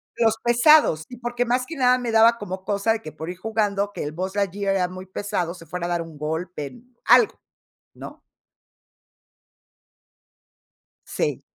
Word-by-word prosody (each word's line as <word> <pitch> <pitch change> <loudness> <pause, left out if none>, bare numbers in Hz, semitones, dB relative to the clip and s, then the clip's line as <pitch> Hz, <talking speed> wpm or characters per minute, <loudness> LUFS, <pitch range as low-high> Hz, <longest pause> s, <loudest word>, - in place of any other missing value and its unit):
Los 225 -1 +2
pesados 240 - +5
y 245 - -9
porque, 240 0 -2
más 250 +1 0
que 330 - -7
nada, 250 -2 +4
me 245 -2 -3
daba 225 +1 +5
como 190 -2 -7
cosa 205 +2 +1
de 225 - -4
que, 155 - -8
por 160 +2 -7
ir 180 - -10
jugando, 205 -1 -1
que - - -5
el 145 - -4
Buzz 185 +5 -4
Lightyear 200 0 0
era 180 -2 +1
muy 185 0 -9
pesado, 190 -3 -3
se 165 -2 -13
fuera 175 +2 -4
a - - -4
dar 170 -1 0
un 160 -2 -12
golpe, 160 - -5 0.2
algo, 440 - +5 0.5
¿no? - - -11 2.8
Sí. - - -2
200 Hz, 165 wpm, -23 LUFS, 175-235 Hz, 2.8 s, pesados